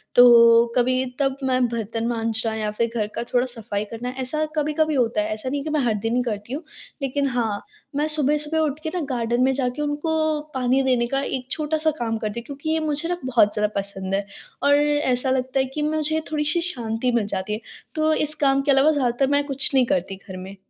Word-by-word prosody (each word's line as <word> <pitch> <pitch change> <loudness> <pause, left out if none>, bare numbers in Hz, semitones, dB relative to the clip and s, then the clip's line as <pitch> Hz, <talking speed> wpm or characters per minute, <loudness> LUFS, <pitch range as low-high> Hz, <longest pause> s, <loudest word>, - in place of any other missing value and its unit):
तो 235 -1 +8
कभी, 255 +1 +2
तब 270 -1 +1
मैं 255 -1 +2
बर्तन 225 0 -3
मांजना 225 -1 -1
या 215 -1 -2
फिर 230 +2 -1
घर 215 -3 0
का - - -2
थोड़ा 245 0 +3
सफ़ाई 225 -4 -4
करना, 230 +3 -6
ऐसा 260 +4 -1
कभी-कभी 305 +1 +1
होता 230 -4 +1
है। 215 +1 -2
ऐसा 215 +4 -4
नहीं 285 - -1
है - - -7
कि 310 - -4
मैं 305 -1 +1
हर 225 - +2
दिन 230 - +1
ही 250 - +2
करती 215 0 -4
हूँ, 300 +5 -4 0.4
लेकिन 275 +1 0
हाँ, 230 -5 -1 0.3
मैं 295 +2 +1
सुबह-सुबह 300 +1 0
उठ 305 -1 0
के 315 - -2
ना, 360 - -1 0.2
गार्डन 240 +1 0
में 265 - +3
जाके 260 +1 -2
उनको 310 +1 0
पानी 260 +1 +2
देने 250 -2 +2
का 270 +3 -1
एक 260 -2 -4
छोटा-सा 315 0 0
काम 225 -1 -1
करती 215 +1 -4
हूँ, 235 - -11
क्योंकि 285 +3 -6
ये 320 0 +2
मुझे 310 +1 -1
ना 355 - -1
बहुत 230 -5 +3
ज़्यादा 210 0 +1
पसंद 195 -1 -3
है 200 0 -1 0.4
और 285 0 +5
ऐसा 290 -3 +1
लगता 260 +1 0
है 265 - +2
कि 300 - -1
मुझे 310 +1 0
थोड़ी-सी 300 +3 0
शांति 245 -7 -1
मिल 235 -3 +1
जाती 195 +1 -3
है। 215 - -4 0.3
तो 310 0 +2
इस 305 0 +1
काम 275 0 +3
के 280 - +1
अलावा 275 +3 +5
ज़्यादातर 265 -2 +1
मैं 285 - +1
कुछ 275 0 +2
नहीं 260 -2 +4
करती 190 -2 -1
घर 185 -2 -7
में। 190 +2 -8
255 Hz, 225 wpm, -23 LUFS, 230-295 Hz, 0.4 s, तो